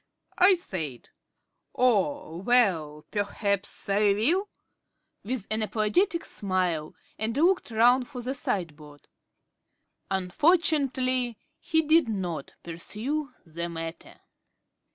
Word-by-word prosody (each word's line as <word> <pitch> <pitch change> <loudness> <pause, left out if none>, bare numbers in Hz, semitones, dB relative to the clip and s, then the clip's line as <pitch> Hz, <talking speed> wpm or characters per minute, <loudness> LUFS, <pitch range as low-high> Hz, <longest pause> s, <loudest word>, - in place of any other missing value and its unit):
I 375 +1 +7
said, 160 - -5 0.7
"Oh, 195 - +1
well, 175 -9 +2
perhaps 200 -1 -2
I 200 0 +3
will," 330 - +1 0.7
with 235 -2 -3
an 220 +1 0
apologetic 235 - +1
smile, 180 -6 -2 0.2
and 225 +3 -2
looked 355 +2 +3
round 240 +3 +4
for 250 -4 -7
the 255 +2 -2
sideboard. 155 - -4 1.0
Unfortunately 255 - +1 0.2
he 320 0 +1
did 315 -4 +4
not 175 -8 -4
pursue 225 - -4
the 170 +1 -5
matter.... 165 0 -7
215 Hz, 95 wpm, -27 LUFS, 175-265 Hz, 1.0 s, I